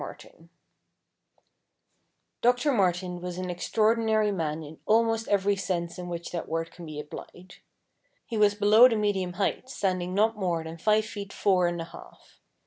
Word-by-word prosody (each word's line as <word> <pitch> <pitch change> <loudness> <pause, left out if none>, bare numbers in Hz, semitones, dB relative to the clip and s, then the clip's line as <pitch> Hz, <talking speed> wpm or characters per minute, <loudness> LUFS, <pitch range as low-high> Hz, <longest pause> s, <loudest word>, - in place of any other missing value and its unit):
MARTIN - - -12 1.9
Doctor 250 +4 +3
Martin 180 -5 0
was 180 0 -5
an 185 -1 -3
extraordinary 220 +3 +1
man 160 -4 -2
in 155 +1 -11
almost 225 0 +2
every 200 0 +2
sense 175 -3 -3
in 180 0 -6
which 170 0 -5
that 170 - -5
word 165 +1 -2
can 175 -2 -11
be 150 -1 -6
applied. 175 +4 -10 0.7
He 235 - -6
was 210 -1 +4
below 210 +4 +7
the 230 - 0
medium 200 -4 0
height, 200 +7 -2
standing 185 -5 -2
not 220 +2 +3
more 175 -5 -1
than 160 +1 -8
five 215 +4 +3
feet 200 -2 -7
four 185 -3 +2
and 175 0 -2
a - - -3
half. - - -15
190 Hz, 160 wpm, -27 LUFS, 175-215 Hz, 1.9 s, below